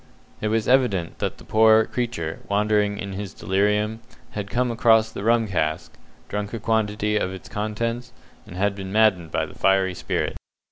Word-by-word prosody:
It 110 - 0
was 110 0 0
evident 125 -10 +2
that - - -2
the - - -14
poor 110 0 +5
creature, 110 -12 -3
wandering 105 0 +1
in 100 -1 -5
his 100 0 -6
delirium, 105 +3 0 0.3
had 105 -1 -5
come 125 +3 0
across 110 -1 +4
the 100 - -6
rum 115 0 +3
cask, 80 -5 -2 0.3
drunk 105 +2 -4
a - - -4
quantity 105 -1 0
of 95 -3 -1
its 95 -1 -9
contents, 115 +3 -3 0.4
and 100 +3 -1
been 95 -1 -6
maddened 100 -6 +3
by - - -1
the - - -12
fiery 95 -1 +2
spirit. - - -2
105 Hz, 170 wpm, -23 LUFS, 95-110 Hz, 0.4 s, poor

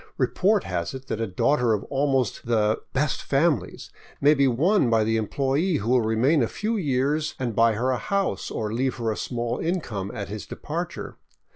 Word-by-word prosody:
Report 200 +1 +2
has 90 +5 -3
it 130 0 -8
that 110 - -2
a 115 - -1
daughter 120 +5 +2
of 105 - -1
almost 135 -6 0
the 110 -2 +2
" - - -49
best 140 +1 0
fam 145 -1 +2
ilies 90 - -11
" - - -24
may 145 +2 +5
be 140 -2 +3
won 140 - +3
by 115 -1 +3
the 110 +1 +1
employee 140 - 0
who 115 -2 -1
will 125 -1 +4
remain 115 +7 +2
a 115 - +2
few 220 - -2
years 150 - 0
and 120 -4 -3
buy 115 0 +4
her 125 +5 0
a 125 - 0
house 200 -1 -1
or 110 -1 -3
leave 130 +2 0
her 115 -3 -1
a - - -2
small 120 0 -3
income 125 - -2
at 100 - -4
his 105 0 -7
departure. - - -5
125 Hz, 210 wpm, -25 LUFS, 110-145 Hz, -, may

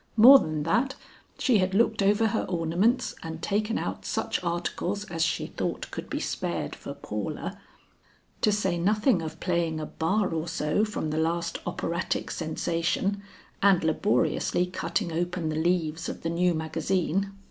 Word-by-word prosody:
More 260 +5 +10
than 155 - -2
that, 245 - +1 0.4
she 245 -6 +3
had 185 0 +1
looked 220 0 +3
over 205 +3 +3
her 220 - -1
ornaments 180 +8 +1
and 160 0 -6
taken 210 +5 0
out - - -3
such - - -2
articles 175 +3 -2
as 165 -1 0
she 160 0 0
thought - - -4
could - - -6
be - - -2
spared - - -3
for - - -8
Paula, - - -5 0.8
to 215 - +4
say 190 -4 0
nothing 210 +2 +3
of 160 -1 -6
playing 170 -3 0
a 155 - -3
bar 190 +6 0
or 160 +1 -2
so 165 +3 0
from 210 -8 -2
the 155 - 0
last 170 +1 -1
operatic 170 0 -2
sensation, 170 +4 -1 0.4
and 195 -3 +5
laboriously 160 +1 +1
cutting 170 -1 -2
open 175 0 -1
the 155 - -2
leaves 165 -1 0
of - - -7
the 165 - -1
new 175 0 +2
magazine. 170 +4 -1
175 Hz, 160 wpm, -27 LUFS, 165-200 Hz, 0.8 s, More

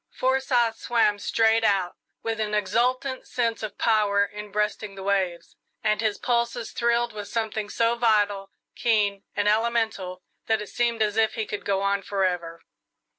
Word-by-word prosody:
Forsyth 255 -3 +1
swam 225 -3 +2
straight 225 +2 +2
out, 195 -4 +1 0.3
with 225 -1 -2
an 210 -1 -1
exultant 250 +6 0
sense 230 -2 -1
of 215 -2 -6
power 205 -3 +3
in 210 0 -9
breasting 210 0 -2
the 195 - -8
waves, 190 -3 -1 0.3
and 215 0 +1
his 215 -2 0
pulses 235 -1 -1
thrilled 235 0 +1
with 205 -1 -6
something 220 -2 -2
so 230 +2 +2
vital, 205 -4 +1 0.3
keen, 205 -4 +1
and 205 0 +1
elemental 215 -4 0 0.2
that 220 0 +2
it 210 - -7
seemed 235 -2 +1
as 210 0 -1
if 220 -1 +2
he 220 - -2
could 205 - -5
go 195 -1 0
on 200 0 +1
forever. 180 -4 -2
215 Hz, 160 wpm, -25 LUFS, 200-230 Hz, 0.3 s, power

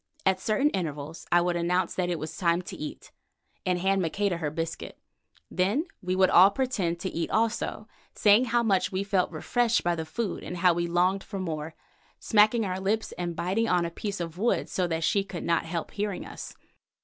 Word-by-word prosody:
At 190 -1 +3
certain 220 +9 +1
intervals 155 -3 -4
I 175 - +5
would 175 0 0
announce 175 +2 0
that 180 -1 -1
it 175 - -1
was 155 0 -6
time 170 +1 +1
to - - -8
eat, 150 - -8 0.6
and 180 -1 +2
hand 190 +2 +1
Maqueda 185 +2 0
her 155 -3 -2
biscuit. 165 +2 -5 0.5
Then 205 - +1 0.2
we 185 0 -1
would 185 0 +4
all 185 +3 +8
pretend 200 -8 -1
to 190 - -2
eat 165 - -2
also, 220 -1 -1 0.3
saying 210 +4 +5
how 240 0 +1
much 195 -5 +2
we 190 +1 -1
felt 195 -2 +1
refreshed 235 +9 +1
by 175 - +2
the 160 -1 -4
food 210 +4 -3
and 180 - -5
how 180 0 +4
we 170 0 -1
longed 180 +3 +1
for 200 - -7
more, 160 -4 -4 0.4
smacking 215 +1 +4
our 185 -1 -2
lips 210 +3 -1
and 175 -1 -4
biting 195 +7 0
on 175 -1 +2
a 170 - -4
piece 200 +2 -4
of 170 0 -5
wood 235 +3 +1
so 180 -1 0
that 165 -1 -2
she 200 +3 +2
could 195 -3 -7
not 170 -1 +1
help 165 0 -4
hearing 205 -2 -3
us. - - -9
185 Hz, 205 wpm, -27 LUFS, 170-205 Hz, 0.6 s, all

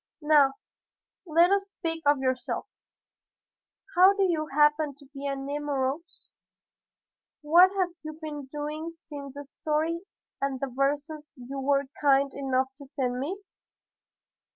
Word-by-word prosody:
Now, 295 -3 +5 0.7
let 340 +3 +5
us 395 0 +1
speak 330 -4 -4
of 290 0 +5
yourself. 260 -1 -2 1.3
How 370 +3 +7
do 400 -1 +1
you 325 -5 +1
happen 295 0 +3
to 285 0 -16
be 280 0 -5
at 275 0 -2
Nemours? 285 +2 -3 1.1
What 345 +5 +7
have 370 -2 +2
you 310 0 -6
been 295 -3 -6
doing 300 +3 -5
since 285 -4 -9
the 285 0 -7
story 310 +4 -1 0.4
and 275 -1 -1
the 270 -2 -4
verses 290 +3 -1
you 265 +2 -7
were 275 +1 +2 0.2
kind 275 -1 +4
enough 265 -1 0
to 280 - -10
send 250 -2 -2
me?" 335 +9 -3
290 Hz, 130 wpm, -27 LUFS, 275-315 Hz, 1.3 s, How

